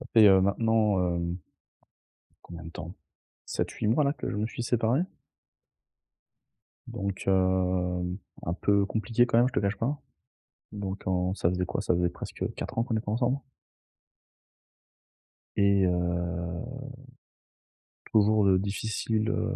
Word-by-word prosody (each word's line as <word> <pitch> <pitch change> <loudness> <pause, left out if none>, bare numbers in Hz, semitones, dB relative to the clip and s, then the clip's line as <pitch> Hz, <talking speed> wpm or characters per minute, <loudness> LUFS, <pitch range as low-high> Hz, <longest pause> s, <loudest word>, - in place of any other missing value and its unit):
ça - - -9
fait, 110 -2 +8
heu, 95 -1 +7
maintenant, 105 +1 +2 0.2
hem 85 0 -2 1.1
combien 85 -1 -9
de 80 - -8
temps? 85 0 -7 0.5
7-8 - - -2
mois, 115 +8 +3
là, 140 -1 +2
que - - -5
je - - -3
me 105 +1 0
suis 120 +1 -5
séparé. 120 +5 +2 1.9
Donc, 100 -5 -4
hem, 90 -1 +1 0.3
un 85 - -1
peu 100 +1 +2
compliqué 115 +3 +1
quand 115 - +3
même, 120 +2 +5
je - - -10
te - - +1
cache 100 0 0
pas. 135 +8 -2 0.7
Donc 100 -1 -5
en 90 0 +1
ça 85 - +1
faisait 90 0 -1
quoi? 95 - -2
Ça 95 - +1
faisait 90 0 +2
presque 90 - -8
4 - - -6
ans - - +4
qu'on 115 -2 -1
était 110 -1 -4
ensemble 120 +4 +1 2.2
et 100 -1 +4
heu, 85 +1 -1 1.5
toujours 105 -1 +4
de 95 -1 +5
difficile, 110 +2 -1
heu, - - -1
100 Hz, 140 wpm, -28 LUFS, 90-110 Hz, 2.2 s, fait